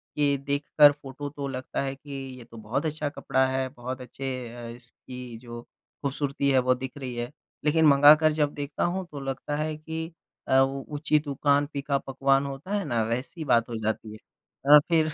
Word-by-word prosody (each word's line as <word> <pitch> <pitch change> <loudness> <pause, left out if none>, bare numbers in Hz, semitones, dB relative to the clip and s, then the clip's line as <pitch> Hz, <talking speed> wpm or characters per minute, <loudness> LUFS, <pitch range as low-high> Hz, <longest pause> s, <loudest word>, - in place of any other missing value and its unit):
कि 145 -1 +2
देखकर 145 +1 +5
फोटो 145 0 -8
तो 140 -1 -5
लगता 130 -1 -4
है 135 -1 -2
कि 140 +1 -13 0.3
ये 125 - -10
तो 115 - -14
बहुत 115 +8 -2
अच्छा 155 -1 -2
कपड़ा 130 -2 +1
है, 130 0 -1
बहुत 130 0 -6
अच्छे 130 -1 -5
अ, 120 -1 -7
इसकी 120 0 -10
जो 120 0 -9
खूबसूरती 140 +2 -3
है 130 - +5
वो 130 0 +3
दिख 130 +2 -7
रही 130 -3 -5
है, 120 +1 -4 0.3
लेकिन 160 +1 +4
मँगाकर 150 +2 +7
जब 145 -1 +1
देखता 145 0 -3
हूँ 185 +2 -1
तो 145 - -6
लगता 135 +2 -3
है 155 +1 -2
कि 160 +1 -5 0.4
अ, 130 - +5
उ 135 0 +1
ऊँची 150 0 +1
दुकान, 145 0 +1
फ़ीका 140 -1 -2
पकवान 135 0 +1
होता 140 +8 -6
है 200 - -1
ना, 120 -5 0
वैसी 125 +9 -3
बात 115 -4 +3
हो 115 - -4
जाती 110 0 -2
है। - - -9 0.6
अ, - - +8
फिर 160 -2 +3
140 Hz, 195 wpm, -27 LUFS, 125-145 Hz, 0.6 s, अ